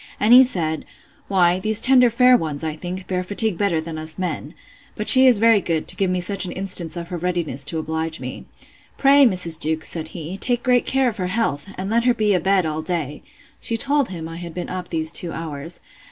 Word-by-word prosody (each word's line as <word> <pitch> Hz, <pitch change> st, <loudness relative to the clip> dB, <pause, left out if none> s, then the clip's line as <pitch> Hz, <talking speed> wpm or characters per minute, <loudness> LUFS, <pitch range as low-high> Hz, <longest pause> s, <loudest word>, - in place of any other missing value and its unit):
And 215 Hz, +3 st, +4 dB
he 255 Hz, +1 st, +9 dB
said, 160 Hz, -, -2 dB, 0.4 s
Why, 180 Hz, -2 st, +2 dB
these 215 Hz, +2 st, +4 dB
tender 250 Hz, 0 st, +5 dB
fair 250 Hz, +2 st, +4 dB
ones, 155 Hz, -8 st, -3 dB
I 155 Hz, -1 st, -3 dB
think, 180 Hz, +3 st, -7 dB
bear 180 Hz, -1 st, -2 dB
fatigue 205 Hz, +2 st, 0 dB
better 175 Hz, -3 st, 0 dB
than 160 Hz, 0 st, -6 dB
us 155 Hz, 0 st, -3 dB
men. 170 Hz, -3 st, -5 dB, 0.4 s
But 210 Hz, -, -5 dB
she 260 Hz, 0 st, +9 dB
is 245 Hz, -4 st, +5 dB
very 225 Hz, -1 st, +4 dB
good, 165 Hz, -3 st, -2 dB
to -, -, +1 dB
give 195 Hz, -2 st, -1 dB
me 180 Hz, 0 st, -1 dB
such 195 Hz, +2 st, 0 dB
an 180 Hz, -, -3 dB
instance 180 Hz, -3 st, -2 dB
of 170 Hz, 0 st, -7 dB
her 180 Hz, -, -5 dB
readiness 170 Hz, -6 st, -2 dB
to 160 Hz, +2 st, -2 dB
oblige 160 Hz, 0 st, -4 dB
me. -, -, -8 dB, 0.5 s
Pray, 275 Hz, 0 st, +5 dB
Mrs. 175 Hz, -6 st, 0 dB
Jewkes, 160 Hz, 0 st, 0 dB
said 160 Hz, -2 st, -5 dB
he, 170 Hz, +2 st, -8 dB
take 245 Hz, +2 st, -1 dB
great 250 Hz, -1 st, +1 dB
care 265 Hz, -1 st, +2 dB
of 230 Hz, -2 st, -3 dB
her 185 Hz, -2 st, -3 dB
health! 185 Hz, -6 st, -2 dB
and 195 Hz, +2 st, -5 dB
let 235 Hz, +1 st, +1 dB
her 245 Hz, -1 st, +3 dB
be 215 Hz, -2 st, +1 dB
a 180 Hz, -, +2 dB
bed 190 Hz, -1 st, +1 dB
all 155 Hz, 0 st, -3 dB
day. 155 Hz, -4 st, -4 dB, 0.4 s
She 230 Hz, -, -3 dB
told 280 Hz, +2 st, 0 dB
him 165 Hz, -3 st, -7 dB
I 165 Hz, 0 st, -9 dB
had 170 Hz, -1 st, -9 dB
been 180 Hz, -, -5 dB
up 185 Hz, 0 st, -6 dB
these 160 Hz, -1 st, -2 dB
two 170 Hz, 0 st, -2 dB
hours. 165 Hz, 0 st, -6 dB
180 Hz, 230 wpm, -21 LUFS, 160-220 Hz, 0.5 s, he